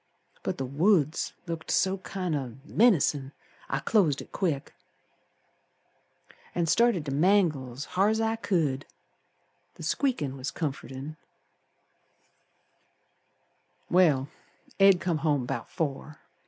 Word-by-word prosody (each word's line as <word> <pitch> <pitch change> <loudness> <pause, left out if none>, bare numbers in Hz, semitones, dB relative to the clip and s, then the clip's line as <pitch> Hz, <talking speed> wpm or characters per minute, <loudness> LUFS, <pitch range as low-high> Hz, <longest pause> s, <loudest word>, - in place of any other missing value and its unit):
But - - -3
the 135 - -2
woods 155 +3 +2
looked 165 -2 -6
so 190 0 +2
kind 185 -4 -3
of 130 -4 -4
menacin' 150 - +2 0.4
I - - 0
closed 170 -11 +2
it - - -10
quick 155 -8 -2 1.8
An' 170 - +1
started 210 -2 +3
to 140 - -3
mangle's 150 -6 +1
hard's 210 +4 +1
I 225 0 +1
could, 160 -10 0 0.9
The - - -10
squeakin' 195 - -1
was 130 +2 -3
comfortin'. 140 -1 -5 2.7
Well, 155 -7 +4 0.5
Ed 195 -2 +7
come 170 -4 -1
home 145 -4 +1
'bout 120 -2 -4
four. 150 -1 -4
155 Hz, 105 wpm, -28 LUFS, 140-190 Hz, 2.7 s, Ed